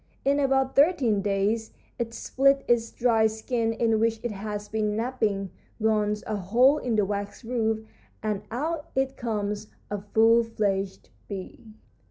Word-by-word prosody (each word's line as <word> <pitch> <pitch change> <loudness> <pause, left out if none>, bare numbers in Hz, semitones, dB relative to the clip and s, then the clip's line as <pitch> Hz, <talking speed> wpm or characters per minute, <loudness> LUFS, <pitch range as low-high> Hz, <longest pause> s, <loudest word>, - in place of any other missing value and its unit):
In 280 +1 +3
about 270 -1 +2
thirteen 275 - +4
days 205 +3 0 0.3
it 235 -1 -2
splits 275 +3 +2
its 230 -1 +2
dried 225 -2 +3
skin, 225 +1 -1
in 225 -1 +1
which 225 0 +1
it 240 - -2
has 210 0 -5
been 210 0 -1
napping, 220 -5 -1 0.3
gnaws 210 -1 +1
a 215 - -2
hole 245 +10 +4
in 240 -3 -1
the 210 -2 +3
wax 205 +3 -4
roof, 220 -2 -1 0.4
and 210 -2 -1
out 295 +6 -3
it 265 0 0
comes 210 -3 -3 0.2
a 205 -1 -2
full 225 +3 +4
fledged 200 -4 -2 0.2
bee. 205 +2 -8
220 Hz, 150 wpm, -26 LUFS, 210-245 Hz, 0.4 s, thirteen